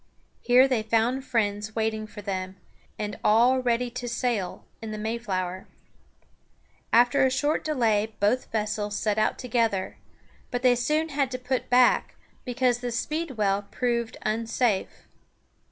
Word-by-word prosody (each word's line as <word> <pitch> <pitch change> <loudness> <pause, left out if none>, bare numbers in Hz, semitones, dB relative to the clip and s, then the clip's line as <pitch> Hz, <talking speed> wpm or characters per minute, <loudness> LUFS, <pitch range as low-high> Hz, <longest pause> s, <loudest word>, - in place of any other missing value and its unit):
Here 250 +2 +5
they 255 -4 +1
found 230 +4 +1
friends 210 -2 -1
waiting 220 -1 -1
for 210 -1 -10
them, 190 -1 -4 0.4
and 210 -1 -4
all 240 +5 +4
ready 245 -1 0
to 245 0 -5
sail 230 -6 -2 0.2
in 225 - -6
the 215 - -5
Mayflower. 200 -5 -3 1.2
After 245 +3 +5
a 265 - +4
short 290 +4 0
delay 225 -8 +1
both 215 +6 +1
vessels 210 -1 -2
set 215 -1 0
out 215 - +1
together; 230 -6 -1 0.5
but 245 0 -3
they 250 -1 +6
soon 300 +7 0
had 275 -3 0
to 255 - -4
put 255 0 -3
back, 250 0 +4 0.3
because 250 -1 +1
the 245 0 -4
Speedwell 230 -8 -1
proved 235 -2 -1
unsafe. 225 -1 -1
235 Hz, 135 wpm, -26 LUFS, 210-250 Hz, 1.2 s, they